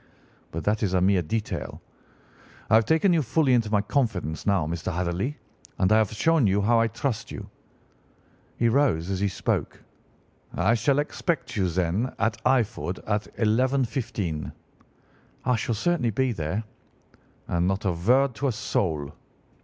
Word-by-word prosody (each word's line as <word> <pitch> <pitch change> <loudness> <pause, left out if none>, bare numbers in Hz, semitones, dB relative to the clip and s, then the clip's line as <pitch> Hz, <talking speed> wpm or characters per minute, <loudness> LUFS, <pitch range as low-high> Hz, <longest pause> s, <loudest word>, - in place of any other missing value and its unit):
But 85 0 -5
that 105 +1 +1
is 95 -4 0
a - - +4
mere 95 0 +3
detail. 105 +7 -4 0.9
I - - +4
have 110 0 +6
taken 160 +4 +3
you 165 - +3
fully 135 +1 +2
into 115 -3 +2
my 105 -1 +2
confidence 100 - -1
now, 100 -6 +2
Mr. 85 +3 -3
Hatherley, 90 - -2 0.4
and 95 +1 +2
I 110 - +6
have 110 -3 +1
shown 140 +3 +3
you 100 +1 +2
how 115 +3 +3
I 115 - +3
trust 115 +1 -3
you.' - - -7 1.1
He 115 - +2
rose 115 - +2
as 95 - -1
he 100 - +1
spoke. 95 - -2 0.7
'I 95 +6 +3
shall 120 +5 +2
expect 150 +2 -2
you, 95 -4 +1
then, 95 +8 -1
at 115 +1 -1
Eyford 115 -7 +1
at 105 0 -1
11:15.' 115 - 0 0.9
"'I 125 - +3
shall 115 +1 -1
certainly 160 +1 +1
be 130 +4 0
there.' 95 +2 -2 0.8
"'And 85 +1 +1
not 95 +2 -1
a 95 - +2
word 125 +10 +2
to 140 - 0
a - - +2
soul. 80 -9 -2
110 Hz, 160 wpm, -26 LUFS, 95-125 Hz, 1.1 s, have